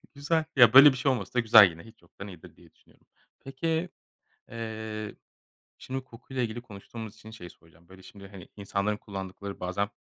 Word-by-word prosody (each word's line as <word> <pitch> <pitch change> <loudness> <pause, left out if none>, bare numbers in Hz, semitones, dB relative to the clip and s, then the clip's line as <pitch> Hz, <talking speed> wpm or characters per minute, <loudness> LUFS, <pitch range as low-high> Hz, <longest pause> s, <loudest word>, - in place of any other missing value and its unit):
Güzel. 155 +3 -1
Ya, 120 -4 +7
böyle 140 +2 +10
bir 130 - -5
şey 135 +2 +1
olması 100 -8 -4
da 125 - +1
güzel 110 -4 +7
yine. 85 0 -13
Hiç 115 - -18
yoktan 85 +4 -12
iyidir 90 -5 -13
diye - - -21
düşünüyorum. - - -29 0.3
Peki, 160 +6 -3 0.6
eee, 110 -2 -6 0.6
şimdi 130 0 -6
koku 125 +1 -16
ile 130 -1 -1
ilgili 115 +1 -5
konuştuğumuz 110 -1 -10
için 110 - -14
şeyi 90 -6 -11
soracağım. 85 +1 -23
Böyle, 95 0 -16
şimdi, 100 +1 -13
hani, 95 -3 -13
insanların 100 +1 -2
kullandıkları 100 0 -8
bazen 95 +3 -2
110 Hz, 180 wpm, -27 LUFS, 100-125 Hz, 0.6 s, böyle